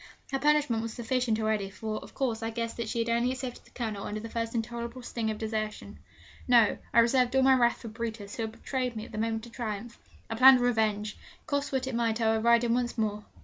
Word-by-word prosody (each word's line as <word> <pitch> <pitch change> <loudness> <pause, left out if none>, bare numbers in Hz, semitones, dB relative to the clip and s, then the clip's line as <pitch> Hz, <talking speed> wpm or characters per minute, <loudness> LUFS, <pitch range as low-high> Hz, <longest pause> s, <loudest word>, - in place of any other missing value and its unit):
Her 270 - 0
punishment 295 -6 +2
was 225 -1 -4
sufficient 240 -1 0
already, 215 -3 0
for, 215 +2 -4
of - - -13
course, 235 -4 -1
I 225 - -2
guessed 230 0 -4
that 230 -2 -3
she - - -3
had 230 0 0
only 235 +2 +2
accepted 255 -1 -6
the - - -19
Colonel 220 -5 -4
under 215 - -4
the 225 +1 -8
first 230 0 -3
intolerable 235 +2 -4
sting 230 -2 -2
of 215 - -2
desertion. 215 -1 -4 0.5
No: 235 -4 +5
I - - -1
reserved 250 +2 +2
all 265 - +5
my 265 0 +6
wrath 240 -2 +2
for - - -6
Brutus, 220 -2 -5
who - - -4
had 220 -1 -3
betrayed 255 0 -3
me 215 - -5
at - - -13
the 215 - -5
moment 225 0 -1
of 235 - -13
triumph. 230 0 -5 0.3
I - - -4
planned 255 +3 +8
revenge. 215 -3 0 0.3
Cost 285 -1 -1
what 265 -1 0
it 260 - -4
might 230 -1 0
I 225 -1 +3
would 220 0 0
ride 235 0 +5
him 230 -1 +2
once 245 0 -1
more. 210 -1 -1
230 Hz, 240 wpm, -29 LUFS, 220-245 Hz, 0.5 s, planned